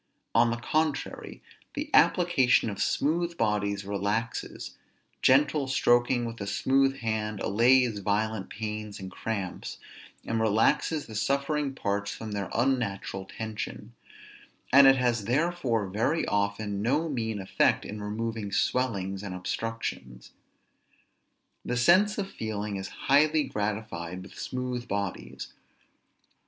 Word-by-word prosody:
On 115 0 +5
the 115 - -1
contrary, 155 +4 -2 0.3
the 295 +1 -4
application 145 - +4
of 100 - -5
smooth 170 +3 0
bodies 100 -2 0
relaxes; 100 +3 -3 0.5
gentle 140 +1 +4
stroking 120 -1 +3
with 115 -2 -6
a 100 - -4
smooth 135 +5 +2
hand 110 -2 -2
allays 120 +1 +3
violent 105 0 -1
pains 105 -1 -5
and 95 -1 -7
cramps, 100 -3 -4 0.5
and 115 -1 -1
relaxes 110 +8 +2
the 110 - -11
suffering 140 +5 0
parts 100 -3 -1
from 110 -1 -7
their 100 -2 -3
unnatural 115 -6 -1
tension; 105 +2 -6 0.8
and 140 0 +9
it 135 - +8
has 120 -4 0
therefore 130 - 0
very 115 - 0
often 100 0 -1
no 145 +9 +1
mean 110 -7 -2
effect 95 - +2
in 105 0 -6
removing 110 0 -3
swellings 100 -4 0
and 100 -3 -5
obstructions. 90 - -5 1.3
The 125 - -2
sense 185 - +4
of 200 -2 -2
feeling 105 - -4
is 95 0 -4 0.2
highly 150 +2 +4
gratified 105 -7 -4
with - - -13
smooth 125 -1 -4
bodies. 65 -10 -4
110 Hz, 120 wpm, -28 LUFS, 100-130 Hz, 1.3 s, and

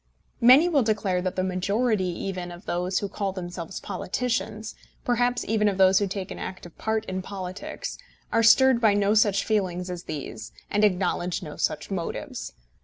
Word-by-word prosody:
Many 260 +8 +8
will 305 -6 +3
declare 210 -5 0
that 185 0 -2
the 185 - 0
majority 200 +3 0
even 180 0 -4
of 175 +3 -11
those 180 +2 -1
who 200 - -1
call 195 0 -3
themselves 175 -1 -6
politicians, 220 0 -3 0.3
perhaps 245 0 +1
even 215 -1 +2
of 195 - -3
those 190 0 +6
who 205 - 0
take 190 0 -5
an - - -6
active 180 -2 -7
part 220 0 -1
in 185 0 -3
politics, 200 - -6 0.3
are 230 - +3
stirred 240 +2 +6
by 215 -3 +5
no 205 0 +3
such 205 -2 +3
feelings 185 -4 -1
as 175 -1 -6
these, 140 - -6 0.2
and 205 +1 +2
acknowledge 180 -3 +1
no 150 - -7
such 150 - -2
motives. 175 -4 -4
195 Hz, 175 wpm, -26 LUFS, 180-220 Hz, 0.3 s, Many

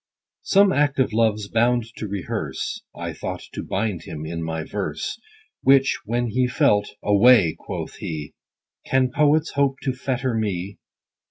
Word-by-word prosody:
SOME 200 -1 +4
act 145 -1 +2
of 130 -5 +1
LOVE'S 110 -2 +1
bound 120 +2 +2
to 110 - -4
rehearse, 100 -3 -4
I - - -5
thought - - -5
to - - -4
bind 100 -3 -2
him 80 -2 -7
in 85 +1 -4
my 80 -1 -3
verse: 105 - -4 0.4
Which 135 0 +4
when 120 +2 -1
he 125 +4 +1
felt, 125 -7 +2
Away, 105 -4 +5
quoth - - -6
he, 75 -2 -5 0.5
Can 130 -1 +1
poets 150 +3 +3
hope 140 -1 +1
to 130 - 0
fetter 130 -1 -2
me 100 -3 -2
115 Hz, 150 wpm, -23 LUFS, 100-135 Hz, 0.5 s, Away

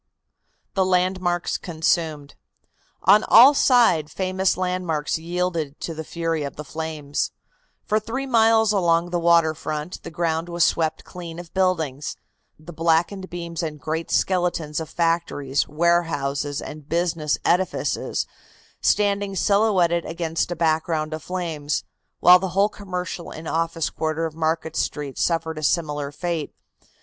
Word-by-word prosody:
THE 190 - +2
LANDMARKS 185 -1 0
CONSUMED. 160 -3 -1 0.7
On 210 - +6
all 255 +6 +8
sides 235 - +4
famous 190 0 0
landmarks 180 -5 -1
yielded 170 -3 -2
to 165 - -4
the 160 0 -6
fury 165 0 -2
of 140 -1 -5
the 150 - -6
flames. 155 -2 -3 0.6
For 215 0 +2
three 235 +6 -4
miles 225 -3 +4
along 175 -3 +2
the 175 - 0
water 170 -2 +4
front 155 +2 -5
the - - -8
ground 165 +1 -1
was 170 0 +1
swept 160 -1 +1
clean 170 -2 -9
of 175 -1 -10
buildings, 160 -7 0 0.4
the 155 +3 -11
blackened 170 +4 +1
beams 170 -1 -5
and 155 -3 -4
great 160 +4 -3
skeletons 175 -5 0
of 160 - -6
factories, 165 -5 0
warehouses 145 -4 0
and 150 -1 -9
business 165 -3 0
edifices 180 +2 0 0.6
standing 200 -1 +1
silhouetted 190 -4 +2
against 165 0 -2
a 175 - -3
background 160 -1 0
of 155 - -5
flames, 165 -5 -3 0.4
while 180 0 +8
the 190 +1 -3
whole 200 +1 +4
commercial 180 -4 -5
and 160 +1 -8
office 165 0 -1
quarter 160 +1 -2
of 160 - -4
Market 160 0 -1
Street 145 -3 -3
suffered 165 -2 0
a - - -8
similar 150 -2 0
fate. 165 0 -4
165 Hz, 140 wpm, -23 LUFS, 155-180 Hz, 0.7 s, all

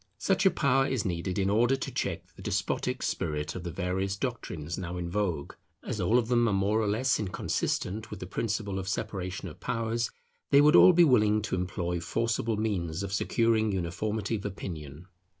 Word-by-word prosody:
Such 190 - +2
a - - +7
power 135 -5 +2
is 130 -6 -1
needed 90 +1 -2
in 95 -1 +1
order 120 +5 +3
to 135 - -5
check - - -3
the - - -12
despotic - - -1
spirit 75 0 -2
of 90 - -6
the 85 - -4
various 95 +3 -2
doctrines 90 - -4
now 90 -1 -5
in 85 -1 -4
vogue. 90 -7 -1 0.3
As 105 - -3
all 100 +7 +3
of 120 -2 +1
them 120 -1 +3
are 105 - +1
more 100 +3 +2
or 110 - 0
less 125 +5 +1
inconsistent 105 +1 -2
with 105 - -7
the - - -5
principle 100 0 -2
of 95 0 -4
separation 95 -2 -3
of 80 - -10
powers, 115 -1 -1 0.4
they 140 - +6
would 150 +3 +6
all 185 - +9
be 175 +1 +6
willing 110 -8 +4
to 105 - -1
employ 90 -1 -2
forcible 115 +4 -1
means 95 -5 -1
of 100 0 -4
securing 110 +1 +2
uniformity 100 +4 -2
of 100 - -9
opinion. 80 -6 -6
100 Hz, 190 wpm, -29 LUFS, 90-115 Hz, 0.4 s, all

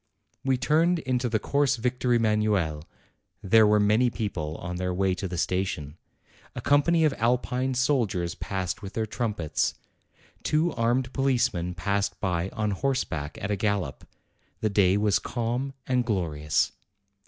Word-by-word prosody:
We 130 -1 +2
turned 160 +7 +3
into 130 -5 -1
the 110 - +1
Course 140 +4 +1
Victor 125 +1 -1
Emanuel; 105 -9 +1 0.6
there 110 +2 +6
were 105 0 +4
many 105 +4 +3
people 90 -10 -3
on 90 +1 -5
their 90 0 -1
way 95 +1 +1
to 95 +1 -4
the 90 -1 -5
station. 90 -4 -2 0.6
A - - -4
company 160 +3 +3
of 150 - +2
Alpine 125 +2 0
soldiers 115 - +1
passed 95 -2 -4
with 100 -1 -8
their 110 - -1
trumpets. 105 - -1 0.7
Two 160 +2 +1
armed 120 +2 0
policemen 120 -10 0
passed 100 +2 -1
by 90 0 -1
on 110 -3 -2
horseback 95 - -2
at 105 - -1
a - - +2
gallop. 100 -7 -1 0.6
The 110 - +1
day 100 -1 +4
was 105 -1 +2
calm 120 +3 -3
and 125 -1 +1
glorious. 80 -9 0
105 Hz, 145 wpm, -26 LUFS, 90-125 Hz, 0.7 s, there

